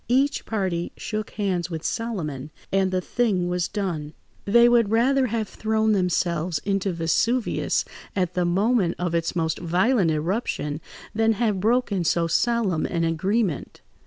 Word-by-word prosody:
Each 275 +3 +1
party 185 -6 -1
shook 215 -1 -4
hands 185 -4 -1
with 165 -2 -5
Solomon, 160 - -3 0.2
and 195 -1 +2
the 185 0 0
thing 195 -4 0
was 180 -1 0
done. 170 -8 -3 0.3
They 235 +4 +6
would 235 -3 +4
rather 255 +4 +3
have 225 -2 -2
thrown 220 +1 0
themselves 175 -3 0
into 195 -1 0
Vesuvius 180 +9 0 0.3
at 180 -2 0
the 180 - +1
moment 190 +1 +2
of 175 -1 -2
its 165 0 -1
most 160 -2 -1
violent 180 +4 +2
eruption 155 -2 -2 0.3
than 225 +1 +3
have 215 -3 0
broken 220 -3 +1
so 170 +1 +2
solemn 195 -1 +1
an 170 -2 -1
agreement. 180 - -1
190 Hz, 145 wpm, -24 LUFS, 170-225 Hz, 0.3 s, They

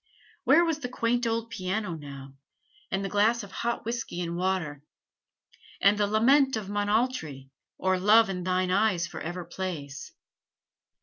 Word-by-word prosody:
Where 340 - +6
was 325 -2 -1
the 250 - -5
quaint 240 0 0
old 230 0 -2
piano 190 0 -2
now; 140 -3 -9 0.6
and 195 +1 -1
the - - 0
glass 215 +4 +2
of 200 - -10
hot 235 -1 -3
whisky 230 -6 -4
and 170 -1 -3
water; 175 -6 -1 1.0
and 200 +1 +5
the 205 0 +1
'Lament 265 +6 +4
of 210 -3 -5
Monaltrie,' 205 - -1 0.3
or 185 0 +1
'Love 220 +4 +6
in 185 -2 -3
thine 185 0 0
eyes 190 -3 +2
forever 175 +2 -6
plays'? 165 -6 -6
195 Hz, 145 wpm, -27 LUFS, 175-230 Hz, 1.0 s, Where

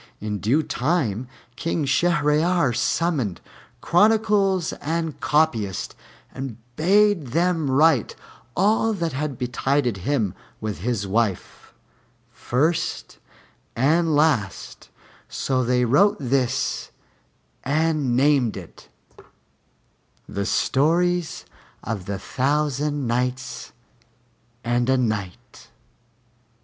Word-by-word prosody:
In 105 -1 -4
due 135 +11 +2
time 130 - -1 0.3
King 165 +1 -2
Shahryar 155 0 +2
summoned 135 - 0 0.4
chronicles 205 -2 +2
and 160 0 -3
copyists, 120 - 0 0.4
and 130 -4 -6 0.2
bade 195 0 +3
them 165 -3 +1
write 140 -2 +3 0.4
all 220 +3 +2
that 170 -6 -2
had 140 -1 -3
betided 125 -1 0
him 105 -1 -1 0.3
with 110 -4 -4
his 110 0 -2
wife, 100 -1 -2 0.6
first 155 +7 -1 0.6
and 160 +5 +2
last; 145 - 0 0.4
so 130 -1 -1
they 125 0 +2
wrote 200 - +4
this 130 -1 -1 0.7
and 150 -3 +1
named 135 -4 +2
it 90 -4 -12 1.4
'The 100 -1 -3
Stories 170 +4 +1 0.4
of 105 -5 -5
the 100 -1 -3
Thousand 145 +4 -1
Nights 125 +2 -3 0.9
and 120 +1 0
A 130 - +4
Night.' 115 0 -4
140 Hz, 90 wpm, -23 LUFS, 120-165 Hz, 1.4 s, wrote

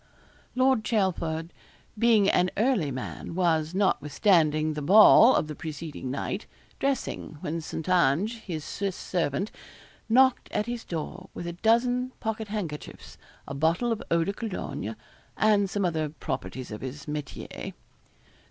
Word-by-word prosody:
Lord 260 -3 +3
Chelford 170 -7 -1 0.4
being 220 -2 +4
an 180 -2 +3
early 215 - +2
man, 130 +5 -6
was, 165 -2 +1
notwithstanding 155 -3 +2
the 150 - -4
ball 215 - +8
of - - +2
the 155 - -6
preceding 155 -3 -6
night, 140 - -3 0.3
dressing, 270 - -2
when 165 +2 -3
St. 160 +1 -6
Ange, 180 - +2
his 165 -8 -6
Swiss 200 -2 -3
servant, 180 +3 -2 0.6
knocked 260 +2 +4
at 210 - 0
his 240 0 -4
door 180 +3 -5
with 175 - -5
a 170 - -4
dozen 245 +6 +2
pockethandkerchiefs, 210 -8 -5 0.3
a 140 - -5
bottle 165 - +1
of 225 - -1
eau 170 0 +3
de 200 - -2
cologne, 145 - -5 0.4
and 205 -2 +3
some 200 0 -1
other 160 -3 0
properties 130 -4 -5
of 105 - -6
his 135 +2 -6
métier. 150 -2 -6
St. - - -7
180 Hz, 140 wpm, -27 LUFS, 155-215 Hz, 0.6 s, ball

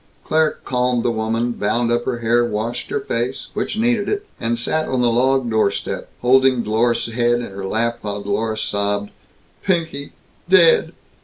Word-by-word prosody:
Claire 155 -1 +2
calmed 125 -2 0
the 120 - +1
woman; 115 +2 -1
bound 115 +2 0
up 120 0 0
her 125 -2 -1
hair; 120 +1 +3
washed 115 +1 -3
her - - -1
face 120 +3 -3
which - - -3
needed 230 -2 +1
it; 415 0 -2
and 115 0 -1
sat 155 +7 0
on 130 - 0
the 120 - +3
log 130 +2 +2
doorstep, 110 -3 -1
holding 130 -1 +4
Dlorus's 115 +2 0
head 120 0 +2
in 120 -4 -4
her 95 0 -6
lap, 115 +3 -1
while 100 -1 -4
Dlorus 110 +2 -1
sobbed, 100 0 -1 0.5
"Pinky 165 -6 -2 0.4
dead! 175 -3 +5
120 Hz, 165 wpm, -20 LUFS, 110-130 Hz, 0.5 s, dead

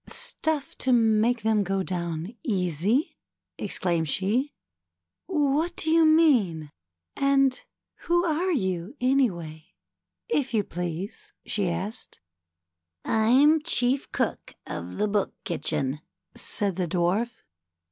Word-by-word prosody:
" - - -32
Stuff 315 -3 -2
to 260 - +1
make 225 0 +3
them 220 -1 +2
go 195 0 -1
down 170 +1 -4
easy? 190 - 0 0.2
" - - -62
exclaimed 170 -3 0
she. 225 - +1 0.4
" - - -61
What 305 0 +1
do 315 - -1
you 325 0 +5
mean? 240 - +3 0.4
And 275 -1 +2 0.5
who 345 +1 +3
are 340 +3 0
you, 190 - -2
any 260 0 +3
way 160 - -10 0.2
— - - -61 0.3
if 265 -4 0
you 210 - +2
please?" 185 - -6
she 200 -4 0
added. 190 +7 -4 0.9
"I'm 265 +8 +4
chief 270 -4 +1
cook - - -2
of 85 +2 -6
the 210 - +1
Book 205 -1 -1
Kitchen," 145 -4 -1 0.3
said 200 -3 -2
the 180 -2 0
Dwarf. 195 +8 -1
220 Hz, 125 wpm, -26 LUFS, 175-275 Hz, 0.9 s, you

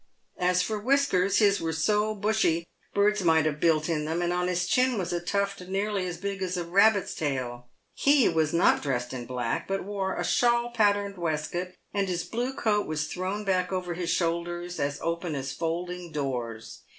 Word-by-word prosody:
As 180 0 +2
for 215 -1 -2
whiskers, 205 -6 +2
his 200 -2 +4
were 165 0 -1
so 210 +6 +1
bushy 205 -5 +1 0.3
birds 205 0 +3
might 160 -2 +4
have 150 -1 -1
built 155 -2 +2
in 155 -3 -1
them, 165 +3 -1
and 175 0 0
on 180 0 0
his 180 0 0
chin 250 +4 +2
was 180 -3 -2
a 175 - 0
tuft 200 +2 -1
nearly 195 0 -1
as 175 -1 -4
big 195 +1 -4
as 185 -1 -2
a 175 - -1
rabbit's 200 +3 +3
tail. 125 -5 -3 0.2
He 280 -3 +4
was 160 -2 +1
not 170 - +4
dressed 125 -3 -2
in 120 -2 -6
black, 125 -2 -2
but 195 0 -2
wore 195 -1 -2
a - - -2
shawl 240 0 +2
patterned 205 -3 +1
waistcoat, 170 +3 -2 0.2
and 200 -1 0
his 175 -2 -1
blue 245 +3 -3
coat 210 -4 +1
was 155 -1 -1
thrown 190 +3 -3
back 185 -1 +1
over 180 -2 -2
his 170 0 -3
shoulders 175 +1 -1
as 140 0 -1
open 170 -1 -2
as 135 -1 -3
folding 175 +2 -4
doors. 125 -6 -4
180 Hz, 190 wpm, -27 LUFS, 160-200 Hz, 0.3 s, his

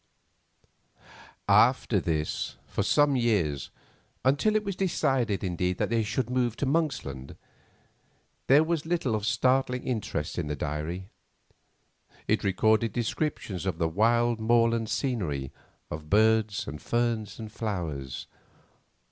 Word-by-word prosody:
After - - +4
this, 75 -2 -2
for - - -2
some 145 -1 +3
years—until 120 - -1
it 215 - +2
was 200 -2 -3
decided, 130 - 0
indeed, 90 0 -1
that - - -1
they 115 -1 +2
should 115 +3 -1
move 125 -2 0
to 145 - -2
Monksland—there 135 - -2
was 160 -1 -2
little 165 -8 0
of 105 0 -1
startling 125 +3 +1
interest 100 - -3
in 80 - -2
the 75 - -2
diary. 75 +6 -4 1.2
It - - +1
recorded 110 +3 +2
descriptions 115 - -2
of 90 -4 -1
the 85 -1 +1
wild 115 +6 +2
moorland 115 0 +2
scenery, 80 - -2 0.4
of 75 0 -6
birds, 110 0 +3
and 75 +2 -6
ferns, 115 -3 -1
and 110 -2 -8
flowers. 85 - -4
110 Hz, 115 wpm, -28 LUFS, 85-125 Hz, 1.2 s, After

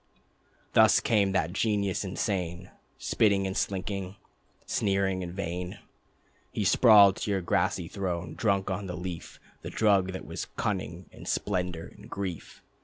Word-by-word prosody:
Thus - - +6
came 100 -4 +2
that 90 -2 0
genius 100 -2 0
insane: 90 -2 -3 0.3
Spitting 100 -3 +2
and 95 0 -3
slinking, 95 -1 -2 0.5
Sneering 95 -2 0
and 90 -1 -5
vain, 90 -1 -4 0.7
He 105 - -2
sprawled 100 -1 +7
to - - -3
your 100 -2 +1
grassy 90 -1 0
throne, 90 -3 -3
drunk 100 -3 0
on 95 +1 -3
The 90 -1 -5
Leaf, 90 -1 -7 0.2
The - - -6
drug 100 -4 +2
that 95 - -6
was - - -5
cunning 95 -3 -3
and - - -12
splendor 90 -4 -1
and - - -14
grief. 95 -4 -6
95 Hz, 140 wpm, -28 LUFS, 90-100 Hz, 0.7 s, sprawled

